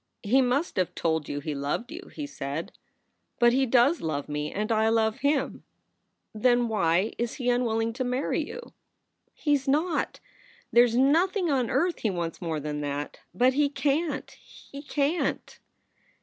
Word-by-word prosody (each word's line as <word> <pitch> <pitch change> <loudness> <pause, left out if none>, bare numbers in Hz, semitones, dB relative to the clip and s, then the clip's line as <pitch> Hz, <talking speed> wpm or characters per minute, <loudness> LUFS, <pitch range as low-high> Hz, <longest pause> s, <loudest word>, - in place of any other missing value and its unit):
"He 245 +6 +4
must 265 +5 0
have 185 -2 0
told 160 -2 -1
you 145 - -3
he 150 +1 -3
loved 145 - -3
you," 360 +4 -9
he 300 - -5
said. 145 - -5 0.7
"But 240 0 +5
he 265 +1 +2
does 255 +7 +4
love 145 -3 -3
me, 150 0 -3
and 210 +3 -2
I 220 0 +3
love 220 -1 +1
him." 285 0 0 0.7
"Then 240 +2 +3
why 190 -1 +1
is 235 0 -2
he 250 -3 0
unwilling 230 -2 0
to 255 +2 -2
marry 250 +2 -1
you?" 485 - -9 0.6
"He 295 - +1
s 275 -1 0
not! 310 +6 0 0.5
There 240 +1 +7
s 235 -1 -2
nothing 335 - +3
on 255 -4 +1
earth 350 0 +1
he 220 - 0
wants 170 -3 -4
more 165 -3 -2
than 150 0 -4
that. 145 0 -4 0.2
But 255 +2 +4
he 285 +1 +2
can 295 +3 0
t, - - -19
he 280 - -12
can 290 +3 0
t!" - - -17
240 Hz, 175 wpm, -27 LUFS, 175-280 Hz, 0.7 s, There